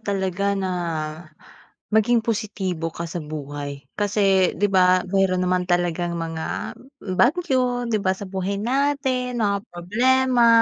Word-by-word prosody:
talaga 200 -1 -1
na 190 -1 -1 1.2
maging 225 +2 +3
positibo 195 -7 -2
ka 170 - -6
sa 170 +1 -5
buhay. 145 -2 -6
Kasi 195 -3 +2
'di 205 - +2
ba 185 -1 +4
meron 190 -1 +2
naman 180 0 +1
talagang 175 0 0
mga 165 -1 -4 0.4
bagyo, 255 - +2
'di 220 -3 0
ba, 185 - +2
sa 200 - -7
buhay 190 +1 -2
natin, 255 +1 0
mga 200 -1 +1
problema. 240 +7 +2
195 Hz, 125 wpm, -23 LUFS, 180-235 Hz, 1.2 s, ba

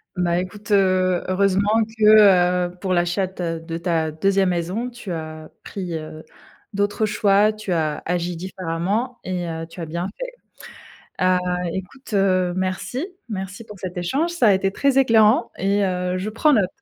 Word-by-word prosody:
Ben, 175 -1 0
écoute, 185 +4 -4
heu, 185 -2 +3
heureusement 200 +3 +2
que, 190 -5 +6
heu, - - -19
pour 185 -2 0
l'achat 175 +2 +1
de 185 - -11
ta 165 -3 -3
de 165 0 -6
ta 165 -3 0
2e 195 +3 +2
maison, 180 +8 -2
tu 225 -6 -8
as 155 -1 -6
pris, 180 -4 -6
heu, 155 0 -9 0.5
d'autres 205 +2 0
choix, 205 0 +3
tu 215 -3 -6
as 155 -3 -1
agi 175 0 -1
différemment 190 +7 -3
et 180 -2 -3
heu, 165 0 -4
tu 170 +1 -10
as 165 - -5
bien 170 +3 -3
fait. - - -5 0.9
Heu, 185 0 +4 0.3
écoute, 215 +6 -7
heu, 185 -2 +2
merci 190 - -2 0.2
merci 195 +1 -5
pour 210 -2 -12
cet 180 0 -6
échange, 270 - 0
ça 250 -11 +3
a - - +6
été 195 0 0
très 275 +2 +2
éclairant 225 -3 +4
et 200 +1 +1
heu, 180 0 -1
je 205 +4 -3
prends 295 +7 +3
note. 200 -7 +3
185 Hz, 170 wpm, -22 LUFS, 175-210 Hz, 0.9 s, que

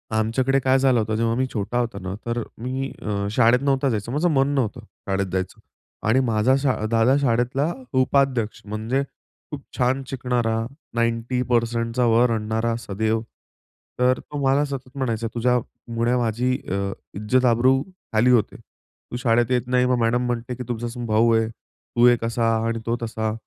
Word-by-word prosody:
आमच्याकडे 130 +5 +2
काय 130 0 +3
झालं 130 -3 +3
होतं 110 0 -1
जेव्हा 115 +1 +1
मी 130 +1 +1
छोटा 110 +3 -2
होता 115 -4 -2
ना 95 0 -4
तर 120 0 -1 0.2
मी 130 +3 -3
अ, 100 -1 -2
शाळेत 120 +2 +4
नव्हता 135 -1 +1
जायचं, 110 +1 -2
माझं 160 +5 +1
मन 135 -1 +3
नव्हतं; 125 -1 -1 0.3
शाळेत 95 0 0
जायचं. 95 0 -3 0.5
आणि 125 +4 +4
माझा 110 +4 +3
शा 135 -3 +2 0.2
दादा 115 +4 +4
शाळेतला 130 +5 +1 0.3
उपाध्यक्ष, 130 -4 +1
म्हणजे 110 +6 -1 0.5
खूप 145 -2 -5 0.2
छान 130 +2 +1
शिकणारा, 120 -3 -1 0.4
90% 115 0 0
वर 115 +2 +4
आणणारा 110 +1 -1
सदैव. 110 +1 -1 0.8
तर 125 +1 +3
तो 145 - -8
मला 140 +2 +3
सतत 135 -2 -6
म्हणायचा 115 -4 -1
तुझ्यामुळे 120 0 -1
माझी 120 +2 0 0.2
अ, 100 0 -1 0.2
इज्जत 115 +6 +1
आब्रू 130 +3 +3 0.3
खाली 115 +4 +4
होते. 115 -4 +2 0.6
तू - - -4
शाळेत 120 0 +2
येत 125 -1 +1
नाही. 125 0 +2
मग 125 0 +2
मॅडम 120 +2 +1
म्हणते 120 0 -3
की 125 - -6
तुमचा 120 0 -3
स 120 - -8
भाऊ 110 +2 +3
आहे, 110 0 +2
तू 120 +1 -2
एक 120 -1 +3
असा 115 -1 +1
आणि 115 0 -1
तो 115 +1 0
तसा. 110 -1 -2
120 Hz, 165 wpm, -23 LUFS, 115-130 Hz, 0.8 s, शाळेत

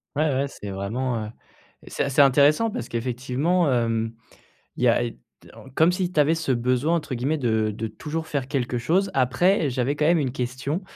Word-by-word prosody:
Ouais 155 0 +1
ouais, 135 +2 0
c'est 105 -6 -9
vraiment, 110 +4 -3
heu, - - -7 0.6
c'est - - -2
assez 140 +1 +3
intéressant 145 - +4
parce 125 - -5
qu'effectivement, 130 +8 0
hem, 115 -2 0 0.6
il - - -1
y - - +5
a - - +3
i - - -6 0.3
en 135 - -14
comme 160 +4 +4
si 180 -1 -1
tu 170 - -4
avais 150 +3 +3
ce 160 -5 -1
besoin 125 +6 +1
entre 150 -5 -4
guillemets 135 +6 -1
de 110 -6 0
de 110 +2 -4
«Toujours 155 +9 -5
faire 135 -3 -3
quelque 125 -3 -1
chose». 185 +10 +1
Après, 140 +6 +2
j'avais 130 +2 -1
quand 150 - 0
même 170 0 +4
une 130 -4 -1
question. 130 +6 -3
135 Hz, 195 wpm, -24 LUFS, 120-155 Hz, 0.6 s, y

